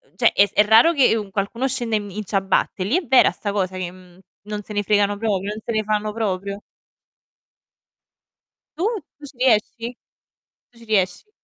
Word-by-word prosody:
cioè, - - +3
è 200 - +5
s 200 - -13
è 210 - +5
raro 225 +10 +6
che, 270 -7 +4
u 210 -2 -5
qualcuno 220 +7 -2
scenda 240 -3 -1
in 205 - -5
mi 200 0 -10
in 215 - -3
ciabatte, 195 -1 0
lì 230 - +1
è 365 - -3
vera 265 -1 +5
sta 205 - -4
cosa 190 -2 -2
che, 180 -2 -4
mhmm, 180 -1 -18 0.2
non 210 0 -5
se 210 - -12
ne 205 0 0
fregano 205 0 +2
proprio, 205 -2 -1
non 215 - -5
se 235 - -4
ne 215 0 0
fanno 210 0 -1
proprio? 200 -2 -3 2.2
Tu? 335 - -2 0.4
Tu 295 - -10
ci 275 - -15
riesci? 235 0 +1 0.7
Tu 235 - -23
ci 230 - -15
riesci. 210 - -1
210 Hz, 195 wpm, -21 LUFS, 200-230 Hz, 2.2 s, raro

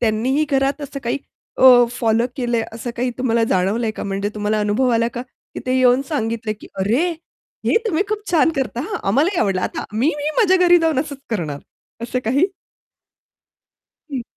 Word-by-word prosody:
त्यांनीही 245 +6 +1
घरात 275 +1 +1
असं 280 0 -6
काही 240 +4 -1 0.4
अ, - - +4 0.3
फॉलो 230 -1 +1
केलंय, 240 -3 0
असं 230 +2 -5
काही 250 +1 0
तुम्हाला 235 -3 +2
जाणवलंय 205 +5 +1
का? - - -3
म्हणजे 200 +1 -2
तुम्हाला 210 0 0
अनुभव 210 +5 +1
आला 230 - +1
का? 240 - -3 0.3
की - - -5
ते 255 - +1
येऊन 250 0 +4
सांगितले 225 -6 -2
की 210 - -13
"अरे 230 - +2 0.6
हे - - +3
तुम्ही 380 -3 +1
खूप 430 0 -1
छान 325 -1 +4
करता 260 -3 -2
हां 430 - -2
आम्हालाही 310 - +2
आवडलं 190 -3 +1
आता - - -3
मी 230 +6 +1
मी 295 +1 -2
माझ्या 380 -6 +4
घरी 350 0 +7
जाऊन 320 -4 +1
असंच 285 -2 -6
करणार." 160 -10 -2 0.4
असं 240 +2 -2
काही? 275 +11 +3 1.7
हं. 255 -4 -3
245 Hz, 175 wpm, -20 LUFS, 220-285 Hz, 1.7 s, घरी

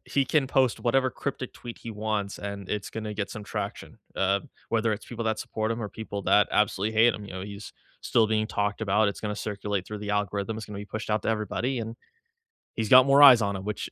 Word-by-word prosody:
he 140 -1 +1
can 140 -1 +2
post 130 -3 +2
whatever 130 +2 +2
cryptic 135 -2 -5
tweet 120 -1 -9
he 115 - -7
wants 105 -2 -3
and 100 -1 -6
it's 105 -1 -3
gonna 110 -1 -5
get 100 -2 -3
some 105 - -7
traction, 105 -1 -5 0.2
uh, 100 +1 +2 0.3
whether 115 -1 +2
it's 105 - -5
people 115 -1 -5
that 110 -1 0
support 110 0 -3
him 115 +1 -2
or 105 - -3
people 100 -2 -6
that 105 +1 +4
absolutely 105 0 +1
hate 115 +1 +5
him, 105 - -7
you 100 - -9
know, 95 0 -5
he's 100 +1 -8 0.3
still 110 -2 +3
being 110 0 +1
talked 105 0 -2
about, 105 0 +2
it's 100 - -5
gonna 105 -1 -3
circulate 100 -2 -3
through 105 -1 -6
the 105 0 -4
algorithm, 105 +1 -1
it's 110 - -7
gonna 105 -1 -7
be 105 - -6
pushed 110 +2 -6
out 105 - +1
to - - -2
everybody, 110 +4 -1
and 115 +1 -5 0.8
he's 110 -2 -2
got 130 +1 +8
more 140 +1 +6
eyes 125 -6 +10
on 100 -1 -1
him, 95 - -7
which 105 -1 -4
105 Hz, 235 wpm, -27 LUFS, 100-115 Hz, 0.8 s, eyes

